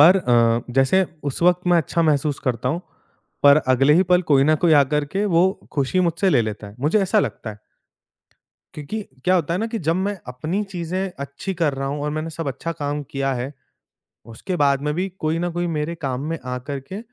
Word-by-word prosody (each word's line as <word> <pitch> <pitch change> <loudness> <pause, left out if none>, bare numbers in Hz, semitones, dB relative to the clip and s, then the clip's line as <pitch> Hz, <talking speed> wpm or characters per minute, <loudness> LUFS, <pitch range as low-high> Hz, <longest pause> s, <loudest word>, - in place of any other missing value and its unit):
पर 175 +6 +8
अ, 120 -5 +2
जैसे 135 +9 +4 0.2
उस 140 +3 -3
वक़्त 180 0 +3
मैं 175 - +5
अच्छा 165 +1 0
महसूस 150 -2 +1
करता 125 -1 -1
हूँ, 170 +5 -1 0.6
पर 145 0 +8
अगले 135 +3 +4
ही 180 - +5
पल 180 0 +3
कोई 135 -1 +5
न 155 +2 +4
कोई 165 +1 +3
आ 145 - +7
करके 150 +8 -1
वो 180 0 +4 0.2
खुशी 145 +6 +1
मुझसे 180 +2 +1
ले 120 - +4
लेता 110 -1 -5
है, 100 - -12
मुझे 160 +9 +2
ऐसा 205 +3 +2
लगता 115 - -4
है। 105 - -11 1.2
क्योंकि 155 +9 -5 0.2
क्या 185 - +4
होता 170 -1 +1
है - - -1
ना 225 - 0
कि 230 0 -4
जब 165 -2 0
मैं 195 +1 -2
अपनी 155 +11 -2
चीज़ें 180 +2 -3
अच्छी 140 +7 -5
कर 160 -5 0
रहा 135 0 -3
हूँ 145 +1 -3
और 150 - -1
मैंने 155 +2 -3
सब 160 -2 -4
अच्छा 165 +5 -4
काम 145 +1 -2
किया 135 0 -1
है, 125 +3 -4 0.7
उसके 115 - -5
बाद 140 0 +2
में 150 0 -1
भी 185 +3 -1
कोई 155 +1 0
न 175 0 -1
कोई 175 +1 -2
मेरे 150 +3 -2
काम 135 -5 -3
में 165 - -2
आ 125 0 -3
करके 140 +8 -5
155 Hz, 215 wpm, -22 LUFS, 135-180 Hz, 1.2 s, पर